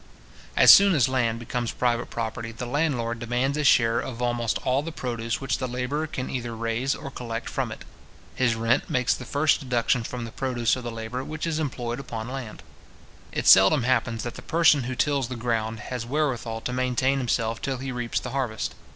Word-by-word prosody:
As - - +10
soon 200 -2 +6
as 135 -4 +4
land 120 -3 0
becomes 120 0 -3
private 120 -1 0
property, 115 0 -4
the 115 +2 -6
landlord 120 -4 -1
demands 125 +4 0
a 150 - -1
share 115 -3 +4
of 120 -1 -5
almost 120 -2 0
all 130 +2 +2
the 165 +2 -6
produce 115 -6 -3
which 135 -2 -2
the 130 - -2
labourer 125 +5 -2
can 130 -4 -4
either 120 -2 -4
raise 115 +4 -1
or 140 - -8
collect 115 -2 -5
from - - -2
it. - - -9 0.5
His 125 -3 +1
rent 115 +1 +1
makes 125 -1 +2
the 125 - -7
first 150 +5 +2
deduction 125 -3 0
from 120 +1 -5
the 115 - -8
produce 120 -3 0
of 130 - -7
the 120 - -4
labour 115 +3 -5
which 155 +3 -5
is 160 -2 -1
employed 125 -5 -3
upon 115 -4 -6
land. 130 -5 -7 0.7
It - - -3
seldom 95 +6 +7
happens 115 -2 0
that 120 - -4
the - - -10
person 160 -5 +3
who 130 +1 -3
tills 140 -2 +1
the 125 - -5
ground 115 -2 -2
has 125 -2 -3
wherewithal 120 -4 -2
to 125 - -3
maintain 130 +2 +1
himself 115 -2 -1
till 135 -1 -2
he 135 +1 -5
reaps 120 -2 -2
the 125 - -6
harvest. 125 -5 -2
125 Hz, 205 wpm, -25 LUFS, 115-135 Hz, 0.7 s, As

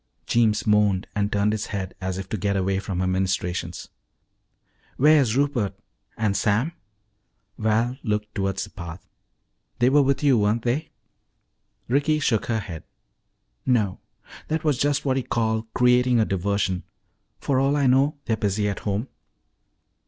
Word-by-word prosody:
Jeems 115 -3 +2
moaned 105 -3 +3
and 105 0 -1
turned 100 +1 +2
his 110 -1 -3
head 95 -3 -4
as 95 0 -3
if 95 -1 -5
to - - -2
get 100 0 0
away 95 0 0
from 95 -2 -3
her - - +1
ministrations. 95 -1 -2 1.1
"Where's 140 -5 +4
Rupert 140 -8 0 0.4
and 105 -3 0
Sam?" 110 +12 +1 0.9
Val 115 +4 +1
looked 105 -1 -2
toward 95 -2 -1
the - - -4
path. 85 -1 -9 0.7
"They 125 +2 +3
were 145 +1 +6
with 140 +1 +1
you, 135 -5 +4
weren't 105 +3 +1
they?" 130 +7 -1 1.0
Ricky 145 +5 +2
shook 115 -7 +1
her 110 -2 0
head. 85 -5 -8 0.8
"No. 110 -7 +1 0.5
That 160 +1 -1
was 150 -5 +1
just 145 0 +1
what 135 -1 +1
you 130 - -1
call 110 -1 -1
creating 125 0 +4
a 110 - +3
diversion. 95 -1 -1 0.6
For 135 -2 +1
all 135 +2 +2
I 145 -2 +2
know, 135 +4 +3
they're 110 - 0
busy 105 -1 0
at 100 - -2
home." 105 +4 -2
110 Hz, 150 wpm, -24 LUFS, 100-130 Hz, 1.1 s, were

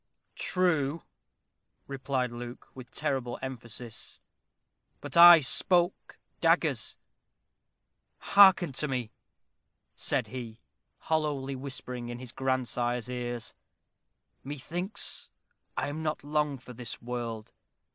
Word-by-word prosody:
"True," 165 -4 +1 0.8
replied 135 -2 -2
Luke, 120 +1 -8
with 130 -2 -11
terrible 135 -5 -2
emphasis, 120 -3 -7 0.8
"but - - -7
I 170 -1 +11
spoke 175 +6 +2 0.2
daggers. - - +2 1.2
Hearken 190 -5 +6
to 140 +3 -2
me," 125 -5 -3 0.8
said - - 0
he, 120 -4 -7 0.4
hollowly 145 -4 -1
whispering 125 -2 -5
in 120 - -5
his 125 -1 -8
grandsire's 125 -2 -1
ears. 120 -2 -4 0.9
"Methinks 175 - -4 0.5
I - - 0
am 155 +2 -5
not 155 -2 -2
long 150 -1 0
for 125 0 -12
this 120 -1 -7
world. 115 -2 -5
130 Hz, 95 wpm, -29 LUFS, 120-150 Hz, 1.2 s, I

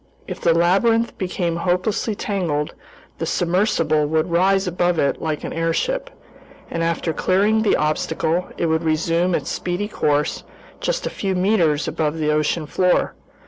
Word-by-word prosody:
If - - -6
the 170 - +3
labyrinth 195 +8 +2
became 180 -2 -2
hopelessly 185 +5 0
tangled, 170 -9 -2 0.5
the - - -2
submersible 170 -4 +1
would 160 +3 0
rise 190 +3 +3
above 175 -1 0
it 140 - 0
like 155 -2 -2
an - - -4
airship, 325 - -1 0.6
and 165 - -2
after 165 0 -1
clearing 205 +7 +2
the 215 - +3
obstacle, 160 +3 0
it - - 0
would 160 0 +1
resume 165 +2 +1
its - - -3
speedy 180 +3 -2
course 150 -7 0 0.4
just - - -2
a - - -2
few 195 -2 -2
meters 180 -6 +2
above 155 0 -1
the 150 -1 +1
ocean 155 +1 0
floor. 180 +4 +1
170 Hz, 150 wpm, -21 LUFS, 160-190 Hz, 0.6 s, the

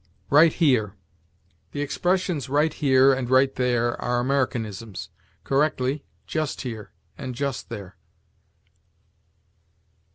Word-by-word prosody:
RIGHT 155 +3 +6
HERE. 125 - +2 0.8
The 145 - -3
expressions 175 -2 -1
"right 150 +3 +2
here" 135 -1 +4
and 130 -2 -2
"right 130 +1 +4
there" 120 -2 0
are 120 0 0
Americanisms. 115 -6 -2 0.3
Correctly, 140 -1 0 0.2
"just 155 -3 -2
here" 115 -5 -6 0.3
and 130 -1 -5
"just 140 0 -3
there." 100 -5 -8
130 Hz, 100 wpm, -24 LUFS, 120-145 Hz, 0.8 s, RIGHT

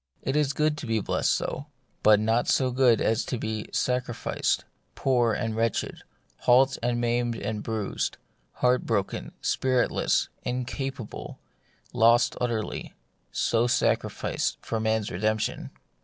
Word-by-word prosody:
It 135 - -1
is 150 -2 +2
good 150 0 +1
to 135 - -6
be 115 -1 +1
blest - - 0
so; 140 - -2 0.3
but 105 -1 +6
not 115 +3 +1
so 130 -1 +2
good 125 -3 +4
as 110 +1 +2
to 125 - -2
be 110 -1 -4
sacrificed, 125 -2 -1 0.3
poor 120 -3 +2
and 110 0 -2
wretched, 115 -1 -1 0.4
halt 130 +2 +4
and 120 0 0
maimed 120 0 0
and 110 -1 -3
bruised, 110 -3 -2 0.4
heart 125 0 +2
broken, 100 -4 -1
spiritless, 130 -1 +1
incapable, 130 -1 -4 0.6
lost 120 0 +4
utterly 115 -3 -2 0.2
— - - -44 0.2
so 115 +1 +3
sacrificed - - 0
for 115 - -3
man's 110 -1 0
redemption. 110 +4 -1
120 Hz, 130 wpm, -27 LUFS, 110-125 Hz, 0.6 s, but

